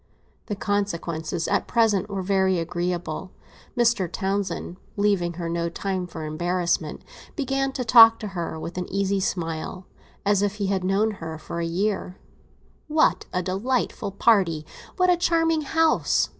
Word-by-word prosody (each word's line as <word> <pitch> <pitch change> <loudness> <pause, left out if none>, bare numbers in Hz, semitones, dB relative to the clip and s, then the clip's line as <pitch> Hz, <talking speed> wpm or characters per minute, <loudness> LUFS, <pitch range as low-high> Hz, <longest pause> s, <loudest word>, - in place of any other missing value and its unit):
The 205 - -2
consequences 170 -6 -2
at - - 0
present 215 -4 +2
were 195 -2 -3
very 190 -1 +2
agreeable. 175 +1 -3 0.4
Mr. 235 -7 +2
Townsend, 190 -2 -2 0.2
leaving 200 -4 +1
her 170 0 -4
no 170 0 -1
time 185 +1 -3
for 160 -2 -7
embarrassment, 175 +3 -1 0.3
began 270 -2 0
to 250 - -3
talk 225 -1 +8 0.4
with 170 +3 -5
an 180 - -5
easy 195 0 +1
smile, 175 0 -3 0.4
as 200 -1 +3
if 205 0 0
he 205 -1 -2
had 190 -1 0
known 200 +4 +2
her 165 -5 -6
for 165 +2 -6
a 170 - -1
year. 190 +1 -1 0.7
"What 310 0 +2
a 180 -1 -1
delightful 200 +5 -1
party! 190 -6 +2 0.3
What 365 -1 +4
a 355 - +3
charming 330 -2 +2
house! 320 +2 +2
195 Hz, 145 wpm, -24 LUFS, 175-215 Hz, 0.7 s, talk